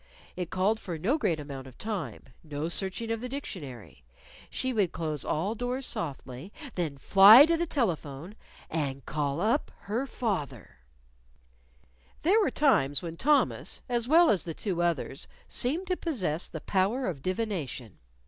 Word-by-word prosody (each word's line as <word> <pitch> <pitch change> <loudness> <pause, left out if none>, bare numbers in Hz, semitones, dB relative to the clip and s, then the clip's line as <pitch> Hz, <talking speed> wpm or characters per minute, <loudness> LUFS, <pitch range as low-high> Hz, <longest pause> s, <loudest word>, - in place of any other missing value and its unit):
It 180 -2 -4
called 200 +4 +1
for 175 -6 -5
no 235 - +1
great 165 - +1
amount 140 -2 -7
of 130 - -14
time: 210 -3 -4 0.2
no 150 0 -4
searching 195 +5 -2
of 225 -1 -2
the 250 - -4
dictionary. 130 - -7 0.5
She 260 0 -1
would 205 -7 +1
close 155 -3 -3
all 185 +8 -1
doors 245 +3 -3
softly; 140 - -5 0.2
then 160 -6 -2
fly 200 - +9
to 335 +1 +2
the 340 +1 -1
telephone 170 - -2 0.3
and 140 -4 -3
call 145 -1 -1
up 225 - +1
her 235 +7 -2
father. 150 - -4 1.4
There 395 +8 +5
were 405 - +2
times 175 - +2
when 165 -1 -5
Thomas 290 - +1
as 240 -2 -1
well 330 +4 +6
as 190 - +1
the 165 -2 -5
two 185 -5 -2
others 165 -5 -1 0.2
seemed 310 +10 -1
to 365 0 0
possess 185 - -2
the 160 - -7
power 205 +7 +1
of 160 -7 -3
divination. 180 - -3
185 Hz, 155 wpm, -29 LUFS, 150-245 Hz, 1.4 s, fly